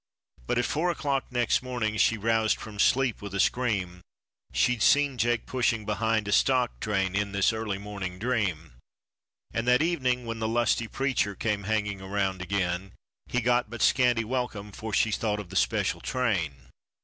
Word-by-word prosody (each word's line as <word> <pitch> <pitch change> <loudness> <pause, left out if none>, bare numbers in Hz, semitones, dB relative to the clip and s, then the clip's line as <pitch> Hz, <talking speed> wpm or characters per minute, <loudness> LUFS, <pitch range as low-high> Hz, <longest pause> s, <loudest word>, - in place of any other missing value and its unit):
But - - 0
at 125 - +2
four 165 +4 0
o'clock 140 -5 -1
next 120 -2 +1
morning, 120 -4 -2
she 115 +1 +3
roused 110 +1 +1
from 105 -2 -9
sleep 130 +1 +2
with 100 -1 -6
a - - -1
scream; 95 -7 0 0.5
She'd 125 -2 +1
seen 145 +2 +4
Jake 120 -1 +1
pushing 115 -4 0
behind 110 0 0
a - - -1
stock 125 +2 +2
train 95 -3 0
in 100 0 -1
this 100 +3 +2
early 110 -3 -3
morning 100 -3 -6
dream. 95 - -1 0.8
And 115 +1 -2
that 125 +4 +5
evening 130 -7 0
when 115 0 -4
the 110 - -1
lusty 115 0 +1
preacher 130 -6 -1
came 105 -2 -2
hanging 105 -2 -1
around 95 -1 -2
again, 95 0 -2 0.3
He 125 - 0
got 120 -1 +2
but 120 0 -7
a - - +8
scanty 125 -3 +3
welcome, 110 -4 -3
for 110 +3 -6
she 110 +2 +2
thought 105 -1 -1
of 100 -4 -8
the - - -8
special - - +1
train. 85 - -2
110 Hz, 175 wpm, -27 LUFS, 100-125 Hz, 0.8 s, a